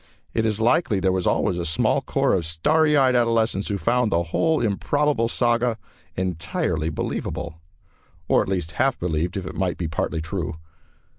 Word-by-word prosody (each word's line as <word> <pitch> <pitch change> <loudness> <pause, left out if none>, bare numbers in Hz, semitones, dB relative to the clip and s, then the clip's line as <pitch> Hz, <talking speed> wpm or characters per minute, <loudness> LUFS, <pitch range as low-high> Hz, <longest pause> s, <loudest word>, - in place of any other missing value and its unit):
It 110 -1 +1
is 110 -1 -1
likely 115 - +2
there 95 0 +2
was 95 -1 0
always 90 -4 +1
a - - -2
small 80 -1 +1
corps - - +1
of 85 -4 0
starry 150 - +2
eyed 130 -2 +4
adolescents 115 -4 +1
who 100 - -1
found 120 +5 +1
the 85 -1 +2
whole 160 - +1
improbable 120 +4 +1
saga 120 -1 +1 0.4
entirely 85 -2 -2
believable, 80 +2 -4 0.7
or - - +4
at - - -3
least 90 -4 -2
half 135 0 +2
believed 85 +2 -2
it 90 -5 -5
might 95 -3 -1
be 85 - -2
partly 80 +1 -2
true. 80 0 -4
95 Hz, 165 wpm, -23 LUFS, 85-120 Hz, 0.7 s, eyed